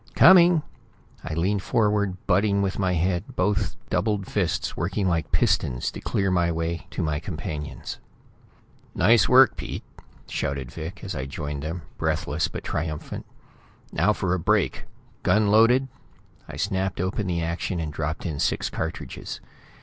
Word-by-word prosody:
"Coming!" 175 -3 +7 0.6
I 80 -1 -4
leaned 95 +4 +1
forward, 105 -3 +1
butting 100 +2 +2
with 95 0 -2
my 95 -2 +1
head, 90 +1 -1
both 100 +2 0 0.2
doubled 100 +1 0
fists 90 -5 -1
working 95 +4 -1
like 85 -3 0
pistons 85 - +1
to - - -8
clear 95 -2 0
a 85 -1 +2
way 80 -1 -3
to - - -3
my 75 -2 0
companions. 75 -5 -6 1.0
"Nice 115 -3 +5
work, 130 0 +7
Pete!" - - -5 0.4
shouted 70 -3 -3
Vic, 80 +7 -7
as 95 -3 -4
I 65 -1 -3
joined 75 0 -5
them, 80 +3 -4 0.2
breathless 75 +1 0
but - - -7
triumphant. 80 -1 -4 0.6
"Now 100 +4 +3
for 95 -4 0
a 90 - 0
break! 100 +2 +1 0.4
Gun 110 -1 +3
loaded?" 120 +5 +5 0.6
I - - -7
snapped 95 -1 -1
open 95 +3 -1
the 85 -2 -1
action 85 +2 -2
and 80 -2 -3
dropped 75 +1 -3
in 75 -4 -3
six - - 0
cartridges. 80 +1 -5
90 Hz, 150 wpm, -25 LUFS, 80-100 Hz, 1.0 s, Coming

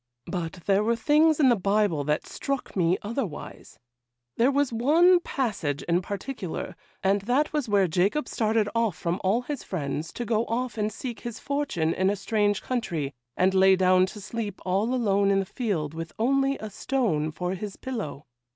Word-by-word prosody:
But 165 -1 -3
there 200 +1 +3
were 230 +2 +2
things 300 +6 +3
in 275 -4 +6
the 240 - +5
Bible 200 -6 +1
that 150 +1 0
struck 275 -1 -4
me 180 -1 +2
otherwise; 210 - -5 0.6
there 240 +3 +4
was 280 -2 +1
one 330 +10 +5
passage 205 - -2
in 175 +1 +1
particular, 200 0 -5 0.3
and 195 +1 +2
that 255 +9 +1
was 295 -6 -1
where 200 -2 +4
Jacob 190 - +1
started 220 -1 +1
off 230 -6 0
from 170 +3 -2
all 210 +6 +2
his 285 -1 -5
friends, 155 -2 -3
to 240 - -4
go 225 0 +1
off 240 0 -2
and 210 -1 -1
seek 240 +2 -6
his 240 -2 -6
fortune 280 - -1
in 190 +1 +1
a 205 - +1
strange 205 0 0
country, 170 - -2 0.2
and 185 +1 +3
lay 190 0 +6
down 185 0 +4
to 210 - -9
sleep 205 -1 -5
all 195 +6 +1
alone 200 -5 +2
in 200 - +3
the 195 - -1
field, 180 - -2
with 165 0 -6
only 275 +4 +2
a 215 -1 -7
stone 200 - 0
for 180 +4 -3
his 195 +1 -5
pillow. 215 - -5
205 Hz, 180 wpm, -26 LUFS, 185-245 Hz, 0.6 s, in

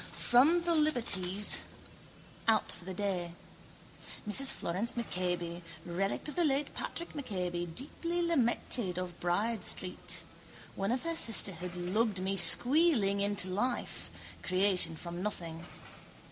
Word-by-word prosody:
From 305 +8 +4
the 340 0 +1
liberties, 220 - +2 0.9
out 220 -1 +2
for 175 - -8
the 190 - -6
day. 180 -4 -2 0.9
Mrs 270 +6 +5
Florence 190 +8 -2
MacCabe, 175 -6 -3 0.2
relict 185 - -2
of 300 - -4
the 350 - +2
late 290 -1 0
Patk 340 - -6
MacCabe, 180 - -4
deeply 335 - -2
lamented, 240 - 0
of 180 -1 -5
Bride 205 +5 -1
Street. 180 -1 -2 0.5
One 195 +3 -2
of 250 +1 -1
her 335 0 -2
sisterhood 180 - +2
lugged 195 +3 0
me 190 +1 -2
squealing 245 - +4
into 200 -2 -1
life. 240 +7 -3 0.3
Creation 185 -3 +3
from 175 +2 -7
nothing. 170 -5 -5
200 Hz, 120 wpm, -31 LUFS, 180-250 Hz, 0.9 s, Mrs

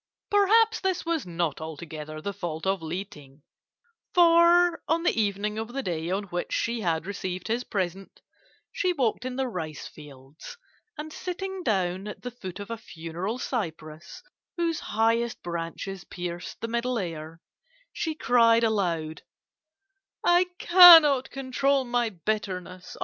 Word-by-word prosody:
Perhaps 440 +2 +4
this 375 -2 -1
was 330 - -1
not 170 -3 -2
altogether 155 -1 -7
the 200 +6 -4
fault 175 -4 -5
of 190 -2 0
Li 175 +5 -4
Ting, 145 -7 -16 0.7
for 340 0 +5
on 330 +1 +1
the - - +3
evening 210 0 -1
of 225 +2 -6
the 275 0 -3
day 165 -3 -3
on 195 +3 -1
which 175 -3 -5
she 235 0 -1
had 165 -4 -1
received 185 -2 -5
his 235 +2 -1
present, 190 -3 -4 0.5
she 365 -1 0
walked 255 -5 -1
in 255 -1 -4
the 265 0 -1
rice 160 -9 -6
fields, 145 - -13 0.4
and 310 +1 -7
sitting 380 +1 -5
down 190 - -1
at 210 - -8
the 245 - -5
foot 190 -6 -8
of 205 +3 -7
a 230 - -3
funereal 175 +3 -6
cypress, 165 - -5 0.3
whose 335 -2 0
highest 230 +2 0
branches 175 +2 -5
pierced 175 -1 -7
the 230 - -2
Middle 235 +2 -1
Air, 165 -4 -6 0.5
she 320 -2 -3
cried 230 -4 +4
aloud: 170 -8 -1 1.0
"'I 350 +1 +4
cannot 325 -7 +8
control 270 +1 0
my 240 -1 0
bitterness. 185 -1 -4
210 Hz, 145 wpm, -26 LUFS, 175-270 Hz, 1.0 s, cannot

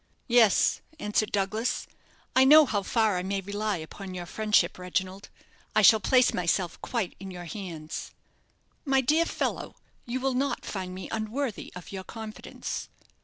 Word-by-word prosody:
"Yes," 235 -5 +4 0.2
answered 210 -2 0
Douglas. 210 +4 -1 0.5
"I 260 - +7
know 300 +3 +8
how 210 -6 0
far 215 -2 +1
I - - -2
may 195 +2 -2
rely 205 +1 -2
upon 185 +4 -8
your 175 -1 -5
friendship, 210 -2 +1
Reginald. 185 +2 -3 0.5
I - - +5
shall 220 - +8
place 250 +3 +4
myself 180 0 0
quite 230 -7 -2
in 195 - -7
your 175 -1 -8
hands." 160 -3 -6 0.7
"My 270 -2 +3
dear 310 +6 +3
fellow, - - -3 0.3
you 245 +2 -2
will 265 0 0
not 270 +3 -1
find 185 -2 -5
me 190 - -6
unworthy 225 +2 -3
of 180 - -9
your 190 -1 -5
confidence." 220 +1 -6
205 Hz, 155 wpm, -28 LUFS, 185-235 Hz, 0.7 s, know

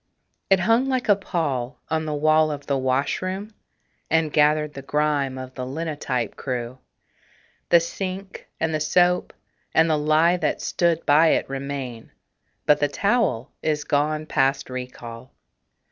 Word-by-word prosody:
It 195 -1 +4
hung 230 +7 +3
like 255 -2 -1
a 205 - +7
pall 145 -10 -3
on 160 0 0
the 155 - -2
wall 155 +1 +3
of 145 -1 -5
the 140 - 0
washroom, 145 +11 -1 0.6
And 160 -2 +1
gathered 150 0 +3
the 140 - -7
grime 145 -2 0
of 130 0 -8
the 130 - -5
linotype 135 -4 -3
crew. 125 -1 -4 0.9
The 170 - +7
sink 190 +2 -6
and 160 0 0
the 155 - 0
soap 180 +4 +2 0.4
and 160 +1 +5
the 155 -2 +2
lye 155 +4 +3
that - - -1
stood 170 -2 0
by 155 +3 +5
it - - 0
Remain; 135 -4 -5 0.6
but 150 - +4
the 145 - +2
towel 185 - 0
is 150 -1 0
gone 150 +2 0
past 135 -2 0
recall. 125 -1 -8
150 Hz, 145 wpm, -23 LUFS, 135-170 Hz, 0.9 s, a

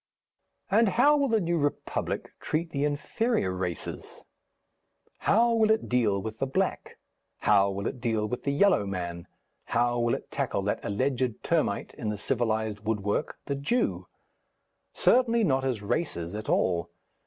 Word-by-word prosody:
And 220 +2 +5
how 265 +9 +5
will 280 -1 +2
the 225 -3 +2
New 170 -3 0
Republic 145 0 -2
treat 165 +2 -2
the 140 0 0
inferior 150 - 0
races? 90 -3 -5 1.0
How 235 +2 +3
will 220 -1 +3
it 220 0 +2
deal 115 -6 +2
with 110 0 -6
the 135 - 0
black? 185 +8 -2 0.4
how 100 -2 +4
will 100 +1 -4
it 125 - -4
deal 110 -3 0
with 125 +2 -4
the 140 - 0
yellow 145 - +3
man? 85 -3 -4 0.4
how 120 +1 +1
will 120 0 +2
it - - -9
tackle - - -1
that - - -1
alleged 125 +2 -1
termite - - 0
in 105 - -4
the 105 - -2
civilized 110 -2 -1
woodwork, 105 +4 -2
the 140 - -2
Jew? 145 - -1 0.8
Certainly 235 -2 +3
not 135 -7 +2
as 125 -6 -2
races 90 - -2
at 105 +1 -5
all. 85 -1 +1
125 Hz, 155 wpm, -28 LUFS, 105-175 Hz, 1.0 s, And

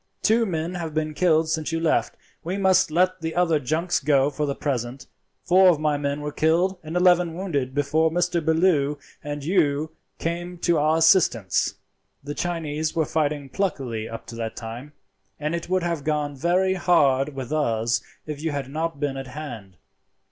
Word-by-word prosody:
Two 225 +1 +3
men 165 -1 -2
have 165 -4 -5
been 155 0 -1
killed 160 -1 +3
since 160 0 -2
you 165 - -1
left. 165 -1 0 0.3
We 180 +4 -3
must 190 -2 +3
let 185 +3 +1
the 160 0 -3
other 170 -3 +3
junks 160 +6 0
go 140 -1 +2
for 150 +1 -2
the 140 - -2
present. 130 -2 -3 0.4
Four 185 +1 +6
of 165 -4 +3
my 150 -1 +1
men 145 0 -2
were 150 0 -4
killed 175 +5 +1
and 160 +2 -4
eleven 180 -2 +4
wounded 145 -8 -2
before 155 +3 +2
Mr. 175 0 0
Bellew 160 -3 +2 0.3
and 145 -1 -5
you 155 -3 +1 0.3
came 175 +1 -4
to 170 -2 +1
our 155 +2 +3
assistance. 160 - +3 0.5
"The 145 +1 -5
Chinese 160 -2 -2
were 160 -2 +2
fighting 150 -3 -1
pluckily 130 - -2
up 115 - -8
to 115 - -9
that 115 -1 -4
time, 120 +5 -8 0.5
and 150 +2 -2
it 170 0 -4
would 185 -1 +1
have 170 -4 -2
gone 150 -1 -1
very 180 +6 +2
hard 145 -6 +2
with 130 +1 -5
us 115 -6 +1 0.2
if 150 -1 -6
you 165 - -1
had 140 -3 -4
not 160 -1 -3
been 140 -2 -2
at 135 -1 -6
hand. 120 -10 -8
155 Hz, 180 wpm, -24 LUFS, 140-175 Hz, 0.5 s, Four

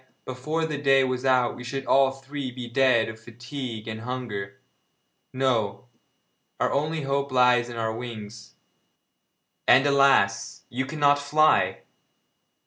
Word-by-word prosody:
Why, - - -35 0.3
before 155 +6 -2
the 150 -3 -4
day 135 -1 +4
was 130 0 -2
out 125 -2 +2
we 125 - -9
should 135 +2 -5
all 135 -1 +4
three 135 0 -6
be 125 -1 -7
dead 125 -2 +3
of 110 0 -8
fatigue 120 0 -8
and 110 0 -5
hunger! 115 -6 -5 0.7
No, 125 -3 -1 0.7
our - - +1
only 155 +2 -1
hope 140 0 -1
lies 125 -1 +3
in 120 - -8
our 110 -1 -1
wings 110 -2 -9 1.1
and, 135 +3 +6
alas! 135 -9 +2
you 130 +2 -3
cannot 145 -1 +2
fly!' 155 +2 +2
130 Hz, 135 wpm, -25 LUFS, 115-140 Hz, 1.1 s, and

